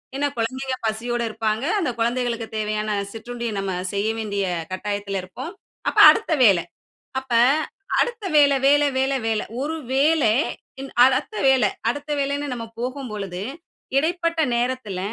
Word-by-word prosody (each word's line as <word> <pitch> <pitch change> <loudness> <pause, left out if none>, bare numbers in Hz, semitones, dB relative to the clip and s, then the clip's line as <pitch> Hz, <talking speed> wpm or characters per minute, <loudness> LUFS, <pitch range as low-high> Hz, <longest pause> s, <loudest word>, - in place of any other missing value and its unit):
ஏன்னா, 285 +1 +1
குழந்தைங்க 260 +3 -2
பசியோடு 235 +2 -2
இருப்பாங்க. 220 +3 -1
அந்த 335 - 0
குழந்தைகளுக்குத் 235 -1 -1
தேவையான 215 0 -1 0.2
சிற்றுண்டிய 235 +1 -5
நம்ம 195 -1 -2 0.2
செய்ய 200 +2 0
வேண்டிய 200 -2 -2 0.3
கட்டாயத்துல 200 0 -3
இருப்போம். 255 - -7 0.4
அப்போ - - +4
அடுத்த 440 -7 -1
வேலை 190 -6 +5 0.6
அப்போ 260 -3 0 0.6
அடுத்த 475 -3 0
வேல 285 -1 +6
வேல 290 +1 +5
வேல 265 +1 +1
வேல 220 -1 0 0.2
ஒரு 310 +3 -2 0.2
வேலை 280 -2 +3 0.5
ன் 270 - -7
அடுத்த 265 +10 +1
வேலை 260 -6 +5 0.2
அடுத்த 290 +5 -3
வேலைன்னு 280 +1 -1
நம்ம 235 -2 -4 0.2
போகும்பொழுது 210 -8 -4 0.5
இடைப்பட்ட 335 +2 +1
நேரத்துல, 240 -5 -2
245 Hz, 130 wpm, -23 LUFS, 215-280 Hz, 0.6 s, வேல